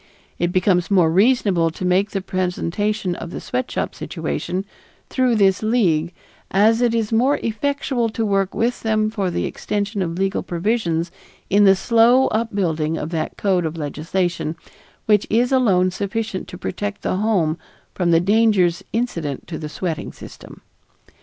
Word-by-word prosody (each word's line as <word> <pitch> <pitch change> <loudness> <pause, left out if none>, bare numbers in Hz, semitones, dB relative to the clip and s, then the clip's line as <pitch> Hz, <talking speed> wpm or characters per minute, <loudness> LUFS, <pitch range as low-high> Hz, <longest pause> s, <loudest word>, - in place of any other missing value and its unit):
It 175 +1 +1
becomes 180 -1 +2
more 180 -5 +4
reasonable 195 -4 +3
to 180 +3 -6
make 185 +3 +2
the 195 - -3
presentation 185 +2 -1
of 170 - -7
the - - -6
sweatshop 125 +1 -3
situation 180 - -4 0.5
through 255 -3 +2
this 195 -3 +3
League, 180 -8 +1 0.4
as 220 +4 +3
it 235 -1 +2
is 225 -1 -1
more 250 +6 +3
effectual 245 +1 -1
to 220 +1 -2
work 195 -2 0
with 240 +2 0
them 215 -1 +1
for 200 -4 -1
the 175 - -2
extension 205 0 -3
of 170 -2 -2
legal 195 0 0
provisions 175 -3 -1 0.4
in 205 +1 +5
the 195 0 +7
slow 230 +6 +4
upbuilding 175 -8 -1
of 150 - -5
that 160 -2 -3
code 190 -3 +1
of 160 0 -3
legislation 165 +2 -2 0.5
which 210 -2 +3
is 240 +4 +2
alone 195 -9 +3
sufficient 200 +1 -3
to 180 - -9
protect 205 +3 -4
the - - 0
home 185 -7 +1 0.3
from 180 -2 0
the 165 -1 +5
dangers 195 -3 +2
incident 170 - -3
to 165 - -6
the 150 - -5
sweating 165 0 -4
system. - - -12
195 Hz, 155 wpm, -21 LUFS, 175-220 Hz, 0.5 s, the